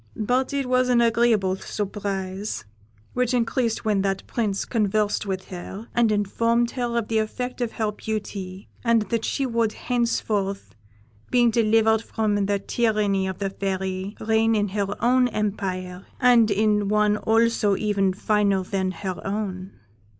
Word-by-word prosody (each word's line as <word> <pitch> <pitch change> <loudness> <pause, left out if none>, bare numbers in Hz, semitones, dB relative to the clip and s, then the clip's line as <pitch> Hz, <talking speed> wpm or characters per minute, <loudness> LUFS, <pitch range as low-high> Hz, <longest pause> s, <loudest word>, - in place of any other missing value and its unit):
But 250 +5 0
it 280 -1 -1
was 255 0 +2
an 245 -1 +4
agreeable 230 -5 +3
surprise, 195 - -4 0.5
which 250 0 +1
increased 230 -1 0
when 210 -3 +2
that 195 -1 -1
Prince 210 -4 -1
conversed 210 -2 0
with 190 -1 -4
her, 190 +4 -8
and 235 -2 +3
informed 230 +3 +1
her 240 -2 -2
of 230 -2 -1
the 225 -1 +1
effect 250 +4 -3
of 235 -2 -1
her 220 -2 -1
beauty, 200 -3 -5 0.2
and 230 -2 +3
that 230 -1 0
she 275 - -1
would 230 -3 0
henceforth, 210 -5 -1 0.6
being 240 -2 +4
delivered 220 -1 +3
from 220 -2 -1
the 200 0 +1
tyranny 205 -2 0
of 190 -1 -4
the 195 -1 -2
Fairy, 190 0 -3
reign 220 +1 +2
in 205 -1 +1
her 200 0 -1 0.2
own 250 +1 +4
empire, 190 -4 -3
and 245 -3 +5
in 210 0 +2
one 210 0 +3
also 225 -2 +2
even 200 -3 +1
finer 200 0 +1
than 190 0 -1
her 185 0 -5
own. 195 -2 -4
215 Hz, 150 wpm, -24 LUFS, 195-230 Hz, 0.6 s, and